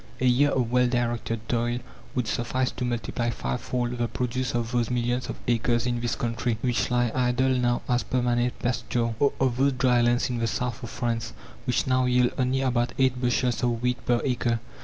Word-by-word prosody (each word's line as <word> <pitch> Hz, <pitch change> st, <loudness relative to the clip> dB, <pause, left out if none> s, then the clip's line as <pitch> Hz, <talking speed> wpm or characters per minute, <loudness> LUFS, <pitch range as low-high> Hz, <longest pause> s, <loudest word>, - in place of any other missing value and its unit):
A 130 Hz, -, 0 dB
year 130 Hz, +4 st, +4 dB
of 125 Hz, -4 st, 0 dB
well 125 Hz, 0 st, +4 dB
directed 120 Hz, -2 st, -1 dB
toil 120 Hz, 0 st, 0 dB, 0.4 s
would 125 Hz, -2 st, 0 dB
suffice 125 Hz, +2 st, -1 dB
to -, -, -5 dB
multiply 120 Hz, 0 st, -2 dB
fivefold 120 Hz, -, -2 dB
the 120 Hz, -, +1 dB
produce 125 Hz, +2 st, -2 dB
of 115 Hz, -1 st, -1 dB
those 120 Hz, -3 st, +1 dB
millions 120 Hz, 0 st, -1 dB
of -, -, -3 dB
acres 120 Hz, 0 st, +1 dB
in 120 Hz, -1 st, -1 dB
this 120 Hz, -1 st, -1 dB
country 115 Hz, -1 st, -1 dB
which 125 Hz, -2 st, +1 dB
lie 120 Hz, -1 st, +2 dB
idle 125 Hz, +1 st, +2 dB
now 125 Hz, -2 st, +1 dB
as 125 Hz, 0 st, +2 dB
"permanent 120 Hz, -1 st, 0 dB
pasture," 120 Hz, -1 st, -1 dB
or 140 Hz, -, +4 dB
of 130 Hz, -2 st, +1 dB
those 135 Hz, +1 st, +3 dB
dry 125 Hz, -1 st, +3 dB
lands 120 Hz, +1 st, +2 dB
in 120 Hz, -2 st, -2 dB
the 115 Hz, -, +1 dB
south 125 Hz, +2 st, -2 dB
of 120 Hz, -, -6 dB
France 115 Hz, -2 st, -2 dB, 0.3 s
which 125 Hz, -, +1 dB
now 130 Hz, -1 st, +2 dB
yield 125 Hz, -1 st, +3 dB
only 130 Hz, +1 st, +1 dB
about 125 Hz, -2 st, +1 dB
eight 130 Hz, -2 st, +2 dB
bushels 125 Hz, 0 st, +1 dB
of 120 Hz, -2 st, +1 dB
wheat 125 Hz, 0 st, 0 dB
per 120 Hz, -1 st, +3 dB
acre. 120 Hz, -3 st, 0 dB
120 Hz, 200 wpm, -26 LUFS, 120-125 Hz, 0.4 s, year